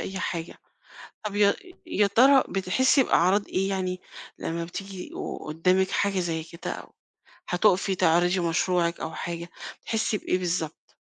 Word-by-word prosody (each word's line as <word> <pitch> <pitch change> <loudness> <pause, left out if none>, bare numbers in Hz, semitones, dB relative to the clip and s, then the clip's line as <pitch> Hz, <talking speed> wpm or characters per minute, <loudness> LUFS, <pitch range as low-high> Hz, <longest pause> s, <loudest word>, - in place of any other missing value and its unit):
أي 190 0 -4
حاجة. 170 -1 -4 0.7
طَب 205 -1 -3
يا 200 -1 +5 0.3
يا 210 -11 +2
ترى 265 +7 +6
بتحسّي 225 +9 +3
بأعراض 195 0 +3
إيه 195 +1 0
يعني 185 -1 -2 0.4
لمّا 165 0 -3
بتيجي 190 +1 -7
و - - -7
وقُدّامِك 185 +5 0
حاجة 200 -2 +1
زي 165 -2 -2
كده 170 +1 -7
أو - - -9 0.6
هتُقفي 190 +1 +3
تعرضي 175 +2 +3
مشروعِك 170 0 +1
أو 160 - -4
حاجة، 170 0 -5 0.3
بتحسّي 220 -1 -1
بإيه 180 - -1
بالضبط؟ 170 -3 -3
185 Hz, 140 wpm, -26 LUFS, 170-200 Hz, 0.7 s, ترى